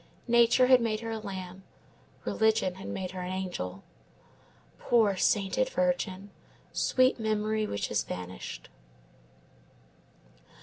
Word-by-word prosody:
Nature 235 +1 +5
had 255 -1 +6
made 220 -1 -1
her 225 -1 -4
a 220 - -3
lamb, 190 -2 -7 0.6
religion 220 -4 +2
had 190 +1 -9
made 185 -1 -4
her 185 -1 -6
an 180 0 -4
angel. 175 - -4 1.0
Poor 220 -5 +3
sainted 205 - +1
virgin! 215 - -1 0.4
Sweet 255 -1 +2
memory 215 0 0
which 100 - -3
has - - +1
vanished! 90 0 -7
210 Hz, 115 wpm, -29 LUFS, 185-230 Hz, 1.0 s, had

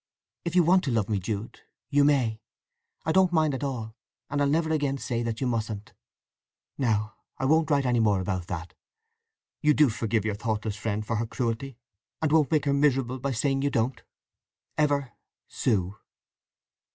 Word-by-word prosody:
If 170 0 -3
you 180 - +6
want 180 +3 +4
to 135 - 0
love 110 -4 0
me, 105 -2 +1
Jude, 105 +3 -5 0.3
you 145 0 +5
may: 125 -7 +2 0.6
I 160 - +2
don't 190 0 +4
mind 155 -3 +2
at 135 - -4
all; 115 -5 -4 0.4
and 145 0 0
I'll 140 - +3
never 160 +3 +1
say - - +3
again 145 -2 0 0.3
that 115 -1 -3
you 135 - -1
mustn't! 110 -3 -3 0.8
Now 110 -4 0 0.2
I 130 - -2
won't 160 +3 +3
write 140 -2 +2
any 120 -1 +2
more 105 -3 +3
about 95 -2 -2
that. 85 -1 -5 0.9
You 150 -1 +4
do 150 -2 +5
forgive 110 -1 -1
your 110 - 0
thoughtless 110 0 -2
friend 105 0 -3
for 115 0 -1
her 115 +1 -1
cruelty? 120 +2 -3 0.4
and 155 -2 0
won't 155 -4 +4
make 155 -2 +2
her 140 - +2
miserable 135 -3 +2
by 140 +2 -2
saying 135 +3 0
you 140 - +1
don't?—Ever, 140 +3 -3 0.4
SUE. 100 -4 0
125 Hz, 175 wpm, -27 LUFS, 110-145 Hz, 0.9 s, you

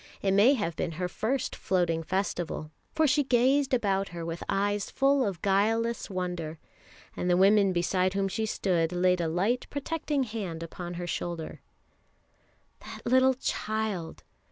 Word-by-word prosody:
It 195 -1 +2
may 220 +8 +6
have 185 -9 -2
been 170 -3 -2
her 180 +3 -2
first 230 +8 -2
Floating 175 -3 0
Festival, 175 -3 -3 0.2
for 315 - +3
she 290 0 +3
gazed 265 +2 +3
about 195 -6 +1
her 170 -1 -6
with 165 0 -5
eyes 205 +1 0
full 275 0 +3
of 195 -6 -3
guileless 225 +5 +1
wonder, 175 -4 -4 0.6
and 180 - -2
the 175 - +4
woman 195 +1 +5
beside 185 +2 +1
whom 195 0 +1
she 220 +4 -2
stood 175 -5 0
laid 180 0 +2
a 165 - 0
light, 195 +10 0
protecting 290 -1 -2
hand 200 -8 -5
upon 175 +1 -7
her 175 0 -4
shoulder. 170 -1 -4 1.2
That - - -10
little 260 +1 +4
child! 215 -8 -3
195 Hz, 155 wpm, -28 LUFS, 175-230 Hz, 1.2 s, may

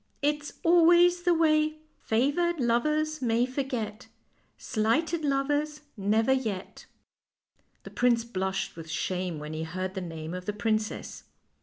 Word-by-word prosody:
It's 295 0 0
always 345 +1 +5
the 350 0 +3
way 310 -1 +2
" 310 - -38
' - - -42
Favored 290 +9 +1
lovers 305 +6 +1
may 235 0 +2
forget, 250 -4 -4 0.5
Slighted 310 +10 0
lovers 290 +2 0
never 220 +4 +2
yet. 220 -8 -4 0.5
'" - - -44
The - - -10
prince 240 -2 +2
blushed 190 -4 -3
with 165 -1 -9
shame 180 +2 -2
when 150 +1 -6
he 155 - -4
heard 185 +3 -4
the 190 - -4
name 165 -2 -6
of 180 0 -6
the 210 - -1
princess. 215 +1 -2
240 Hz, 145 wpm, -28 LUFS, 190-305 Hz, 0.5 s, always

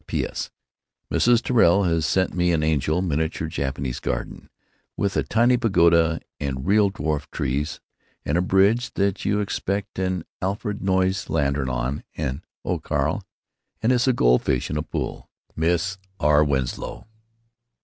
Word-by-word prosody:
P.S. - - -3 0.6
Mrs. 120 -1 +3
Tirrell 100 -6 +4
has 85 -4 +1
sent 95 +3 +1
me 90 0 +2
an 80 -2 +1
angel 80 +3 +1
miniature 80 -1 -1
Jap 70 -4 -3
garden, 60 0 -4 0.5
with 100 -1 0
a - - +3
tiny 120 +3 +3
pergola 85 -7 +3 0.2
& - - -71
real 80 +10 +2
dwarf 80 -3 -3
trees 75 0 -2 0.2
& - - -40
a 85 +5 +1
bridge 100 +7 +2
that 100 0 0
you 105 +1 +1
expect 100 -1 -3
an 95 -2 -1 0.2
Alfred 105 +2 -2
Noyes 95 0 +1
lantern 70 -3 0
on, 65 +3 -2 0.3
& 75 +6 -15
Oh - - -1
Carl, - - -1 0.6
an 115 - +3
issa 125 +1 +3
goldfish 60 - +2
in - - -1
a - - 0
pool! 80 - -5 0.3
Miss 90 +4 0 0.2
R. 75 0 +4
Winslow. 65 -4 -2
85 Hz, 140 wpm, -23 LUFS, 75-100 Hz, 0.6 s, Tirrell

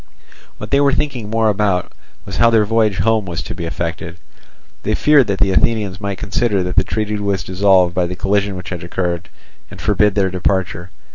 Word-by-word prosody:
What - - -8
they 140 - +4
were 140 -1 +3
thinking 130 -7 -2
more 115 0 +1
about 100 -3 0 0.3
was - - -6
how 115 - +5
their 110 -2 +3
voyage 110 -2 +1
home 110 +2 +1
was 85 -2 -4
to - - -6
be 85 -1 -6
effected; 85 0 -5 0.6
they 110 - 0
feared 145 -3 +4
that 100 -1 -1
the 100 -1 +2
Athenians 100 -1 0
might 100 -1 -3
consider 100 -1 0
that 90 0 -4
the - - +4
treaty 105 -1 -2
was 100 -2 -1
dissolved 95 -2 +3
by 90 -1 0
the 90 - -5
collision 100 +1 0
which 90 0 -7
had 85 -2 -6
occurred, 85 0 -3 0.4
and - - -12
forbid 105 -1 +2
their 95 -2 +1
departure. 90 -1 -1
100 Hz, 200 wpm, -18 LUFS, 90-110 Hz, 0.6 s, how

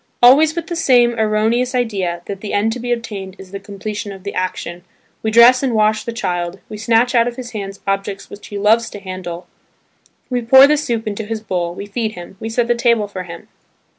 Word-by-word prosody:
Always 300 +6 +7
with 340 -2 -3
the 345 - -4
same 245 -7 +4
erroneous 220 +4 +1
idea, 190 -8 -1
that 195 -1 -6
the 210 - -5
end 220 +2 +1
to 245 - -6
be 245 +1 -4
obtained 205 -5 -4
is 190 -1 -12
the 200 - -5
completion 205 +1 -6
of 190 -1 -11
the 200 - -5
action, 180 -1 -4 0.4
we 220 - -1
dress 235 +3 +7
and 260 -4 0
wash 215 0 +2
the 235 - -3
child, 175 -5 -3
we 215 - -7
snatch 230 +3 +2
out 235 -1 +4
of 240 - -4
his 245 -1 -7
hands 200 -2 -6
objects 195 0 -2
which 205 - -11
he 205 - -6
loves 220 +3 +3
to 205 - -9
handle, 185 -2 -7 0.8
we 250 -1 -1
pour 265 +4 +8
the 300 +2 +4
soup 235 -7 -2
into 215 +1 -3
his 225 +1 -3
bowl, 175 -4 -3
we 200 - -6
feed 215 +1 -3
him, 175 0 -10
we 225 - -5
set 235 +1 0
the 240 - +3
table 235 -3 +2
for 185 -2 -7
him. 170 -1 -10
215 Hz, 225 wpm, -18 LUFS, 195-240 Hz, 0.8 s, pour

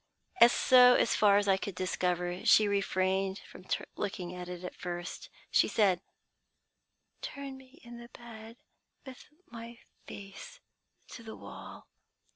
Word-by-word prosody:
"So 250 0 +6
far 205 -3 +4
as 205 0 +1
I 195 -1 +4
could 195 -1 -6
discover, 180 -1 -2
she 215 - +5
refrained 190 -1 0
from 185 - -14 0.3
looking 195 -4 -4
at 180 0 -7
it 180 0 -7
at 180 - -6
first. 175 0 -6 0.2
She - - +4
said, 190 -5 +2 1.2
'Turn 280 -1 -7
me 265 +2 -17
in 240 0 -11
the 235 0 -12
bed, 230 -1 -12 0.5
with 260 -2 -12 0.2
my 230 0 -9 0.3
face 200 - -10 0.5
to - - -10
the 220 -1 -9
wall.' - - -11
200 Hz, 130 wpm, -31 LUFS, 185-235 Hz, 1.2 s, So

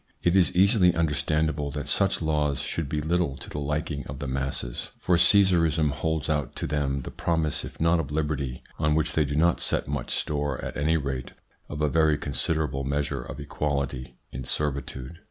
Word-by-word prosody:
It 85 +1 +3
is 90 -8 +5
easily 95 -1 +5
understandable 75 -1 0
that 75 -1 -4
such - - +1
laws 75 -3 +1
should 80 -4 -3
be 75 +1 -1
little 80 -3 0
to - - -9
the 75 - -3
liking 75 0 -2
of - - -6
the 70 - -5
masses, 65 -2 -3
for 90 - +2
Caesarism 85 -5 +4
holds 80 +1 -1
out 75 -4 -1
to - - -3
them 70 -2 -1
the - - -6
promise 80 -3 -1
if - - -9
not 80 +1 +3
of 75 -4 -3
liberty, 75 -4 -2 0.2
on 75 -1 +2
which 80 0 +1
they 80 -2 +3
do 70 +1 -3
not 85 +3 +3
set - - 0
much 70 -3 -3
store, 75 -3 -1
at - - -5
any 80 +3 +2
rate 70 -3 -4 0.4
of 75 +1 -3
a - - +4
very 80 0 +3
considerable 70 0 -1
measure 70 0 -1
of - - -8
equality 70 -3 -3
in 65 - -5
servitude. 70 +1 -3
75 Hz, 190 wpm, -26 LUFS, 70-80 Hz, 0.4 s, is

